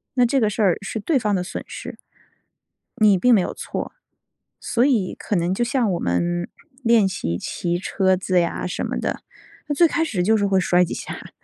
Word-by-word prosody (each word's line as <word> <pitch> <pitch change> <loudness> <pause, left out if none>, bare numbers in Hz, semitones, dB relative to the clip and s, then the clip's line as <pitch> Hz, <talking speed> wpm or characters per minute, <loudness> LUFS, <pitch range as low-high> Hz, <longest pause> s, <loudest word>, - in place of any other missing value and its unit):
那 250 -2 +4
这 270 +3 +2
个 215 -4 +2
事 215 - -3
儿， 190 -4 +3
是 205 +2 -4
对 290 +8 +1
方 210 -3 0
的 180 - -1
损 190 - -6
失。 - - -8 1.0
你 210 -3 +5
并 245 +6 +5
没 205 - +5
有 - - -2
错。 - - -5 0.7
所 240 +2 +1
以 230 -10 +1
可 205 - -3
能 175 +2 0
就 240 - 0
像 240 -3 0
我 175 - -2
们 175 - -1 0.3
练 230 -4 +4
习 85 - -3
骑 175 - -2
车 190 0 +1
子 185 0 +1
呀 170 +1 -2
什 180 - -3
么 - - -3
的， - - -2 0.5
那 290 - 0
最 340 +3 +5
开 325 +1 0
始 200 - -1
就 220 +4 +3
是 200 -1 +1
会 195 -1 +2
摔 180 -1 +3
几 - - -4
下 - - -6
儿， - - -11
195 Hz, 230 characters per minute, -22 LUFS, 180-235 Hz, 1.0 s, 你